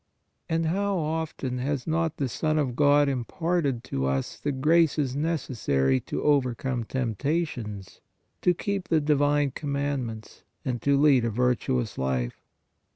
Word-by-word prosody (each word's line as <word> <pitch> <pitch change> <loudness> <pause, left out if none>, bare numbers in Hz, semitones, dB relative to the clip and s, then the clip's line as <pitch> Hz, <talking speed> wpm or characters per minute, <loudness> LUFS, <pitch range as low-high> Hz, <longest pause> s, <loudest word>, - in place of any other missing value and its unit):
And 165 0 +1
how 195 +4 0
often 155 -5 -2
has 135 0 -2
not 165 0 0
the 140 - 0
Son 155 +5 -1
of 135 -5 0
God 145 +1 +5
imparted 140 +1 -1
to 65 0 -2
us 65 0 -2
the 145 - -1
graces 150 0 +2
io 140 +3 -2
PRAYER 165 +2 +1
necessary 70 - 0
to - - -4
overcome 125 -4 +1
temptations, 120 - -3 0.4
to 180 - +3
keep 195 0 -3
the 160 - +3
divine 145 -1 +2
commandments 140 -6 -3 0.2
and 120 -3 -2
to 140 +1 +3
lead 140 -4 +5
a 115 - +1
virtuous 125 0 0
life? 65 -2 -2
140 Hz, 145 wpm, -26 LUFS, 120-155 Hz, 0.4 s, God